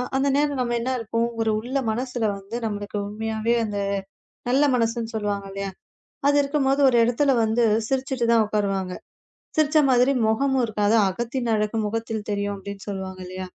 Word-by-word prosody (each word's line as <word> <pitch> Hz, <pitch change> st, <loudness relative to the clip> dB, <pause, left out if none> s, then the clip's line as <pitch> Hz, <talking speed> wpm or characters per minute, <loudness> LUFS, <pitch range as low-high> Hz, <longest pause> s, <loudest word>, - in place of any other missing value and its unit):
அந்த 270 Hz, +1 st, +2 dB
நேரம் 290 Hz, -1 st, +1 dB
நாம 240 Hz, -1 st, 0 dB
என்ன 255 Hz, +3 st, -1 dB
இருப்போம். 230 Hz, +1 st, -1 dB
ஒரு 220 Hz, -1 st, +2 dB
உள்ள 250 Hz, +5 st, -3 dB
மனசுல 245 Hz, 0 st, -2 dB
வந்து 195 Hz, +4 st, -8 dB
நம்மளுக்கு 205 Hz, -1 st, -4 dB
உண்மையாவே 220 Hz, +2 st, -1 dB
அந்த 205 Hz, -1 st, -4 dB, 0.7 s
நல்ல 270 Hz, +4 st, +4 dB
மனசுன்னு 230 Hz, -1 st, -1 dB
சொல்லுவாங்க 205 Hz, -2 st, -2 dB
இல்லையா. 195 Hz, 0 st, -4 dB, 0.6 s
அது 285 Hz, -, +4 dB
இருக்கும்போது 275 Hz, -1 st, +1 dB
ஒரு 245 Hz, -, +3 dB
இடத்துல 270 Hz, +4 st, +2 dB
வந்து 225 Hz, +2 st, +2 dB, 0.3 s
சிரிச்சுட்டு 265 Hz, -2 st, -1 dB
தான் 225 Hz, -2 st, +4 dB
உக்காருவாங்க. 195 Hz, -3 st, -1 dB, 0.6 s
சிரிச்ச 310 Hz, 0 st, +3 dB
மாதிரி 255 Hz, +2 st, +4 dB
முகமும் 260 Hz, +3 st, +2 dB
இருக்காது. 215 Hz, 0 st, +1 dB
அகத்தின் 235 Hz, +4 st, -2 dB
அழகு 210 Hz, +1 st, -1 dB
முகத்தில் 225 Hz, 0 st, -3 dB
தெரியும் 205 Hz, 0 st, -1 dB
அப்படின்னு 195 Hz, 0 st, -8 dB
சொல்லுவாங்க 190 Hz, -1 st, -5 dB
இல்லையா. 185 Hz, +1 st, -6 dB
225 Hz, 155 wpm, -24 LUFS, 205-255 Hz, 0.7 s, நல்ல